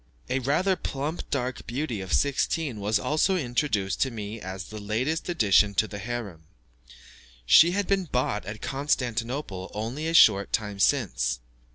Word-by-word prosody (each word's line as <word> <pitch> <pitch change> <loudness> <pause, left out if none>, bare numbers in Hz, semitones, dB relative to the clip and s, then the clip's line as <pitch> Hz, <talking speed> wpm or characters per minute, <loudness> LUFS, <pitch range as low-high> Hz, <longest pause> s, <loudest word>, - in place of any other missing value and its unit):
A 130 - +1
rather 155 +9 +1
plump 150 +1 -4
dark 125 -3 -3
beauty 120 -3 -3
of 95 -1 -7
sixteen 140 -2 0
was 105 +1 +1
also 155 - +1
introduced 120 - -1
to 135 - +3
me 110 -1 -6
as 95 0 -6
the 110 - -7
latest 125 - -2
addition 105 - +3
to 110 - +2
the 100 - -7
harem. 105 -7 -6 1.0
She 165 - +7
had 200 +1 0
been 195 -1 +1
bought 125 - -1
at 105 +1 -7
Constantinople 120 -6 -2
only 120 +9 -3
a 165 - -1
short 100 - +6
time 105 -2 -2
since. 90 - +1
120 Hz, 155 wpm, -26 LUFS, 105-145 Hz, 1.0 s, She